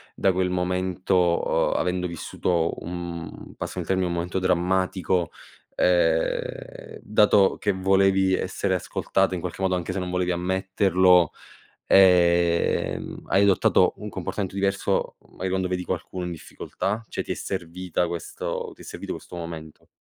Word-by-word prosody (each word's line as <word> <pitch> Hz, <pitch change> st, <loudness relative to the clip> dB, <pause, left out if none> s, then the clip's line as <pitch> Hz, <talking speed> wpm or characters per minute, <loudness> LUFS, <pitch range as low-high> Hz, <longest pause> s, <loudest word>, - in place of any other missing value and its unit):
da 95 Hz, -, +2 dB
quel 90 Hz, 0 st, 0 dB
momento, 90 Hz, -1 st, +1 dB
uhm, -, -, +1 dB
avendo 90 Hz, 0 st, 0 dB
vissuto 85 Hz, 0 st, -1 dB
un 85 Hz, -1 st, -7 dB
passami 90 Hz, -, -5 dB
il 80 Hz, -, -8 dB
termine, 95 Hz, -1 st, +1 dB
un 85 Hz, -, -2 dB
momento 85 Hz, +2 st, -2 dB
drammatico, 90 Hz, -1 st, 0 dB, 0.4 s
ehm, 80 Hz, -2 st, 0 dB
dato 105 Hz, -2 st, +4 dB
che 100 Hz, -, +1 dB
volevi 95 Hz, 0 st, +3 dB
essere 95 Hz, +1 st, -1 dB
ascoltata 95 Hz, +1 st, 0 dB
in 85 Hz, -, -4 dB
qualche 90 Hz, +1 st, -6 dB
modo 95 Hz, -1 st, +1 dB
anche 90 Hz, 0 st, -3 dB
se 95 Hz, -, -2 dB
non 90 Hz, 0 st, -4 dB
volevi 90 Hz, 0 st, 0 dB
ammetterlo, 95 Hz, -1 st, +3 dB, 0.6 s
ehm, 85 Hz, -2 st, +3 dB
hai 100 Hz, -, +3 dB
adottato 100 Hz, -2 st, +4 dB
un -, -, -7 dB
comportamento 95 Hz, -2 st, -4 dB
diverso 100 Hz, 0 st, 0 dB
magari 95 Hz, 0 st, -5 dB
quando 95 Hz, -1 st, 0 dB
vedi 90 Hz, 0 st, -2 dB
qualcuno 90 Hz, 0 st, -4 dB
in 90 Hz, -, -4 dB
difficoltà? 100 Hz, +6 st, -4 dB
Cioè, -, -, -3 dB
ti -, -, -3 dB
è -, -, -2 dB
servita 90 Hz, -1 st, -3 dB
questo 85 Hz, -1 st, -4 dB
ti -, -, -24 dB
è -, -, -11 dB
servito -, -, -6 dB
questo -, -, -9 dB
momento? 85 Hz, -2 st, -8 dB
90 Hz, 145 wpm, -25 LUFS, 85-95 Hz, 0.6 s, dato